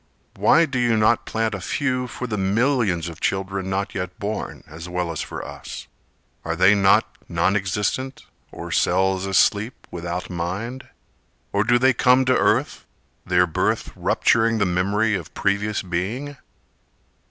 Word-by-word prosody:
Why 165 +1 +4
do 135 -4 -3
you 120 -2 +2
not 110 +2 +2
plant 110 0 -1
a 100 - -5
few 125 +6 -1
For 125 - -6
the 110 -3 -3
millions 100 - +1
of 85 -1 -9
children 95 0 -2
not 100 +1 -2
yet 90 -1 -5
born, 105 +1 -5
As 80 +3 -9
well 90 -1 -2
as 80 - -4
for - - -6
us? - - -8 0.6
Are 80 0 -2
they 95 +4 +5
not 100 -1 +4 0.2
non 85 +4 +1
existent, 105 +7 -2 0.3
or - - -8
cells 95 +1 +1
asleep 100 +4 +1
Without 85 +1 -4
mind? 95 +9 -4 0.7
Or 100 - +2
do 120 +3 +3
they 130 +2 +4
come 125 +2 +4
to 130 0 +3
earth, - - +1 0.4
their 90 0 +4
birth 85 - -1
Rupturing 115 0 +2
the 100 - +2
memory 100 +5 +1
of 90 -6 -5
previous 105 +1 0
being? 105 +11 -3
100 Hz, 155 wpm, -22 LUFS, 90-115 Hz, 0.7 s, they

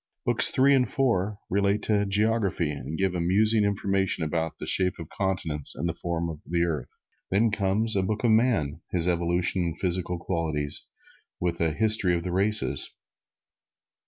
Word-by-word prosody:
Books - - +5
Three 135 +2 +4
and 130 -2 +3
Four 105 -6 0
relate 100 +2 0
of 100 -1 +1
geography 100 -6 +1
and 75 +2 -6
give 95 -1 0
amusing 105 +5 +2
information 95 -3 0
about 80 +1 -2
the - - -6
shape 90 -1 +1
of 80 - -8
the - - -18
continents 85 -7 -2
and 85 - -2
the 85 - -1
form 85 -1 -3
of 80 -2 -6
the 85 0 0
earth. 75 -7 -2 0.4
Then 110 +4 +2
comes 105 +1 +1
a 95 - +2
book 105 +5 -2
on 110 -2 +5
man, 100 - +1
his 90 -1 +1
evolution 85 +1 0
and 85 -2 -3
physical 90 -1 -1
qualities, 80 -5 -2 0.5
with 85 -1 -2
a 80 -1 +2
history 105 -2 +2
of 85 - -3
the 90 - -3
races. 105 +3 +2
90 Hz, 170 wpm, -26 LUFS, 85-105 Hz, 0.5 s, Books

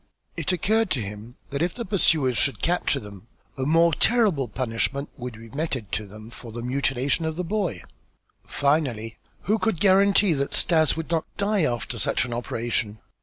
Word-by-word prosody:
It - - -1
occurred 215 +6 +1
to 135 - +1
him 105 +3 -7 0.2
that 140 +1 -2
if 175 +1 0
the 235 - -4
pursuers 160 - +3
should 135 +5 0
capture 175 -5 +1
them, 105 -2 -12 0.3
a 130 0 -2
more 165 +2 +4
terrible 200 - +2
punishment 125 +4 -2
would 125 -4 -7
be 115 0 -12
meted 140 -7 -3
to 105 -1 -2
them 110 +3 -12
for 115 -1 -10
the 115 +1 -6
mutilation 135 +3 0
of 160 0 -2
the 180 - -2
boy. 195 0 -2 0.6
Finally, 130 -7 0 0.2
who 215 +2 +1
could 220 -7 0
guarantee 195 0 +5
that 140 -1 -2
Stas 160 -3 +3
would 165 0 -5
not 165 -2 +1
die 200 -4 +2
after 120 -4 -3
such - - +1
an 120 - -5
operation? 115 -2 -2
140 Hz, 175 wpm, -25 LUFS, 120-175 Hz, 0.6 s, guarantee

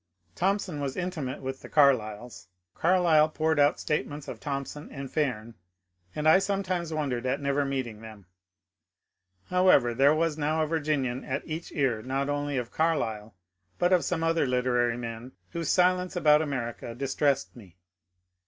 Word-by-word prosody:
Thompson 190 -4 -1
was 135 -2 -3
intimate 155 -8 -4
with 130 0 -5
the - - -11
Carlyles. 120 -7 +1 0.3
Carlyle 165 -3 +3
poured 160 0 0
out 145 0 +4
statements 150 -1 -3
of - - -7
Thompson 140 +1 -5
and 135 -2 -7
Fairn, 120 -7 -2 0.6
and 150 +1 -1
I 160 +4 +7
some 195 0 -1
times 175 -3 -2
wondered 135 -5 -2
at 135 +3 0
never 140 0 0
meeting 130 -6 -4
them. 110 -3 -12 1.3
However, 180 -10 +4
there 140 +5 +4
was 160 -1 0
now 155 +2 +1
a - - -1
Virginian 145 -5 -1
at 135 +2 -3
each 160 +1 -6
ear 130 -8 0
not 135 +3 -2
only 145 -1 -1
of 120 -2 -3
Carlyle 115 - -1 0.4
but 175 +1 +2
of 180 - +4
some 165 -2 -1
other 165 -3 +2
literary 125 -1 +1
men 115 +1 -7 0.2
whose 170 -2 -3
silence 180 0 +2
about 150 -3 +5
America 120 -5 -4
distressed 135 +1 0
me. 95 -8 -15
145 Hz, 155 wpm, -27 LUFS, 125-160 Hz, 1.3 s, I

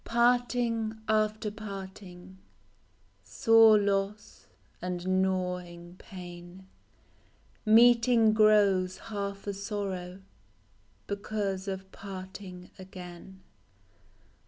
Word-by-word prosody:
T)ARTING 235 -2 +1
after 215 0 0
parting, 190 -3 -10 0.8
Sore 225 -1 +5
loss 200 +1 -2 0.3
and 180 +1 -1
gnawing 180 -2 -3
pain; 175 0 -11 1.0
Meeting 230 0 +5
grows 200 -4 +3
half 200 -3 -6
a 200 - -3
sorrow, 195 -2 -5 0.8
Because 200 -1 -3
of 190 0 -6
parting 190 -2 -9
again. 185 0 -11
195 Hz, 70 wpm, -29 LUFS, 185-215 Hz, 1.0 s, Sore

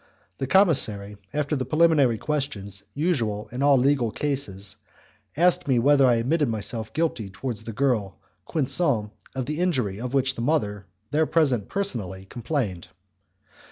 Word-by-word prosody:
The 135 - -2
commissary, 110 - +2
after 150 +2 -1
the 130 - -1
preliminary 155 -6 +3
questions 105 -10 -3
usual 115 - -1
in 125 +2 -4
all 140 -1 +5
legal 130 -2 +2
cases, 105 -8 -2 0.6
asked 180 +1 +4
me 130 -3 +3
whether 140 +2 +5
I 120 - +4
admitted 140 +5 +1
myself 110 +1 -3
guilty 150 -10 -1
towards 110 +2 -5
the 115 - -5
girl 115 -5 0 0.3
Quinson 135 -7 +1 0.2
of 130 -1 -2
the 150 +4 -3
injury 125 - 0
of 125 +2 -3
which 135 -1 +2
the 115 - -6
mother, 105 -8 -1 0.2
there 155 +1 +2
present 135 -11 +1
personally, 105 - -2
complained. 115 - -3
130 Hz, 145 wpm, -25 LUFS, 105-150 Hz, 0.6 s, all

